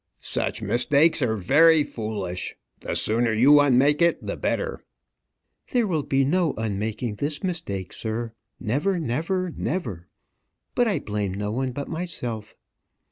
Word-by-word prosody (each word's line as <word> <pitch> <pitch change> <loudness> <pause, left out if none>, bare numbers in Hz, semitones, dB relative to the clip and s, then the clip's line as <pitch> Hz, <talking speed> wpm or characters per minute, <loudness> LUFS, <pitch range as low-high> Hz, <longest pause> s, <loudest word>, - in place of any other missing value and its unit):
"Such - - -2
mistakes 145 +7 +3
are 115 -4 +1
very 150 - +5
foolish. 100 -8 -4 0.2
The - - -4
sooner 115 +2 +2
you 135 +7 +6
unmake 145 +2 +4
it 170 0 +2
the - - -3
better." 480 -2 -2 0.9
"There 245 -2 +3
will 165 -7 0
be 135 -1 +1
no 170 +2 +1
unmaking 110 +1 -3
this 145 - -3
mistake, 130 - -4
sir, 115 +1 -4 0.3
never 145 - 0
never 165 +6 -1
never. 110 - -3 0.7
But 245 - +2
I 200 -6 +1
blame 105 -7 -3
no 105 +1 -3
one 130 +3 -1
but 140 +3 -5
myself." 125 - -5
130 Hz, 135 wpm, -24 LUFS, 110-165 Hz, 0.9 s, you